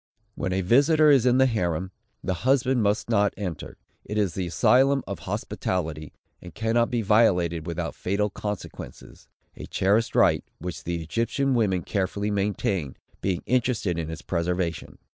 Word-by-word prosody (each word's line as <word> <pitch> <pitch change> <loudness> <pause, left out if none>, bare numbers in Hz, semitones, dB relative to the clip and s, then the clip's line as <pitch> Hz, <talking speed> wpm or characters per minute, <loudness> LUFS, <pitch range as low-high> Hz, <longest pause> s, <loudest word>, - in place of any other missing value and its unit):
When 95 - -3
a 95 +1 0
visitor 145 - +5
is 130 -3 +4
in 125 0 +4
the 130 - +5
harem, 95 -6 -1 0.3
the 95 - -1
husband 130 -1 +2
must 105 +1 +1
not 105 -3 +2
enter. 90 -6 -6 0.3
It 105 - -5
is 100 -5 +1
the 95 0 -3
asylum 130 +11 +3
of - - -5
hospitality, 80 -5 -3 0.3
and 90 -3 -11
cannot 115 +2 +1
be 120 -2 -1
violated 90 -6 +2
without 85 0 -3
fatal 100 +2 -1
consequences; 105 -1 -7 0.3
a - - -9
cherished 105 +4 +1
right, - - +4
which 90 +1 -7
the 85 -1 -3
Egyptian 115 - 0
women 100 -7 +1
carefully 100 +1 -2
maintain, 100 -7 -1 0.3
being 95 -2 -1
interested 115 -8 0
in 80 -1 -4
its 80 - -7
preservation. 85 -2 -2
100 Hz, 155 wpm, -25 LUFS, 90-115 Hz, 0.3 s, visitor